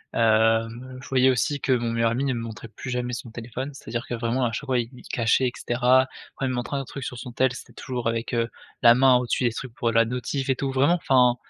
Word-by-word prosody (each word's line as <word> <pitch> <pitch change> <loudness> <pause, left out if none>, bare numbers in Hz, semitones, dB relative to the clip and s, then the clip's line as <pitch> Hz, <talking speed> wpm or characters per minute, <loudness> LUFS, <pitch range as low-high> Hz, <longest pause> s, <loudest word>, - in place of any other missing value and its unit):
Hem, 115 +3 +2
je - - -11
voyais 130 0 +4
aussi 130 +3 0
que - - 0
mon 120 -2 +1
meilleur 115 0 +1
ami 130 +4 -1
ne 135 - +1
me 120 - -3
montrait 115 0 -7
plus 110 +4 -9
jamais 125 0 -2
son 120 -1 -6
téléphone. 120 +5 -6
C'est-à-dire 120 -2 -5
que, 120 - -4
vraiment, 120 +3 -1
à 115 - 0
chaque 120 +6 -4
fois, 130 -2 +1
il 115 -1 -3
il 125 - -13
cachait 115 +2 +2
et 125 - -3
cetera. 125 +2 +3 0.3
Après 135 - -3
il - - 0
me 130 - -2
montrait 120 +3 -3
un - - -1
autre 135 - -10
truc 135 -3 -6
sur 125 - -5
son 125 - -7
tel, 130 +1 +1
c'était - - -10
toujours 125 -3 -4
avec, 115 +2 -3
heu, 115 -1 +1 0.3
la 120 -1 +8
main 130 0 +6
au-dessus 125 +1 +1
des 120 - +1
trucs 125 0 -7
pour 115 -1 0
la 115 +1 +5
notif 125 +3 -3
et 130 - +3
tout, 135 - -2
vraiment, 140 +6 +3
enfin, 125 -7 +4
125 Hz, 270 wpm, -25 LUFS, 115-130 Hz, 0.3 s, la